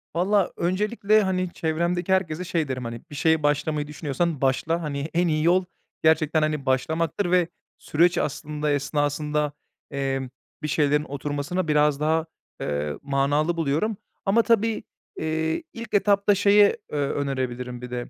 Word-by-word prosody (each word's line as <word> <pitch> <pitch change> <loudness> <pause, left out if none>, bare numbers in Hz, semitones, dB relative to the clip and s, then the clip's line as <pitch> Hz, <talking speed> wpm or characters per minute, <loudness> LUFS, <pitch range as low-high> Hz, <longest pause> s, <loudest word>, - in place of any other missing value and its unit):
Valla, 195 +2 +2
öncelikle, 210 +4 +2
hani, 185 -1 0
çevremdeki 170 +3 0
herkese 180 -2 0
şey 165 -4 -1
derim, 130 -2 -4
hani, 115 0 -6
"Bir 145 - -9
şeye 160 +1 +2
başlamayı 145 +1 0
düşünüyorsan, 150 +1 -2
başla." 155 +5 +1
hani, 150 -1 -3
en 175 +1 +2
iyi 155 -1 +1
yol 180 +2 +3 0.4
gerçekten, 160 0 +3
hani, 155 -2 -1
başlamaktır 160 +8 0
ve 180 -2 +4 0.3
süreç 170 +3 +2
aslında 150 +1 -2
esnasında, 145 +1 0 0.4
emm, 135 -2 -2 0.3
bir - - 0
şeylerin 150 0 +2
oturmasına 145 +5 -3
biraz 150 -1 +3
daha, 160 +1 +1 0.4
eee, 75 0 -2
manalı 145 +4 +1
buluyorum. 165 +8 0 0.3
Ama 205 +4 +4
tabii, 225 -1 +1 0.4
eee, 160 - -1
ilk 230 -1 -8
etapta 200 0 +3
şeye, 205 +1 +5
eee, 150 - -2
önerebilirim 130 -3 -2
bir 125 0 -8
de 120 -1 -4
155 Hz, 145 wpm, -25 LUFS, 145-175 Hz, 0.4 s, şeye